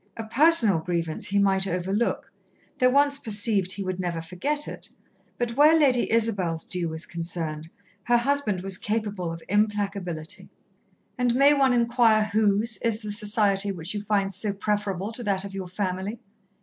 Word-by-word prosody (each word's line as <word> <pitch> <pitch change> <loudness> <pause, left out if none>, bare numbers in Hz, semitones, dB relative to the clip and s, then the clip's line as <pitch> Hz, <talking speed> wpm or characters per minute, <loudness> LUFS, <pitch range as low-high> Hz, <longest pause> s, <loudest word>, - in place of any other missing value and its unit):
A 225 - -4
personal 230 - +6
grievance 165 -1 -3
he 200 - -1
might 195 -1 +2
overlook, 190 +5 -2 0.5
though 255 -1 +4
once 280 +1 +3
perceived 205 -5 0
he 200 0 -5
would 185 -1 -4
never 175 -2 -3
forget 270 - -3
it, - - -8 0.5
but 240 -1 -3
where 305 +4 +6
Lady 260 -5 +2
Isabel's 200 -8 0
due 175 -2 -3
was 160 +1 -4
concerned, 165 -2 -5 0.4
her 240 0 +3
husband 240 -6 0
was 190 0 0
capable 210 -5 -3
of 165 0 -8
implacability. 200 -5 -2 0.7
"And 245 -1 +1
may 280 +3 +5
one 270 -2 +3
inquire 235 -2 +3
whose 215 +1 +2
is 230 -1 -1
the 210 - -5
society 205 -1 +1
which 170 -1 -6
you 205 - -4
find 200 -1 -1
so 205 +2 +2
preferable 205 -1 -2
to 240 +2 -6
that 200 -2 0
of 200 - -8
your 190 -2 -6
family?" 190 +3 -4
205 Hz, 160 wpm, -25 LUFS, 185-230 Hz, 0.7 s, personal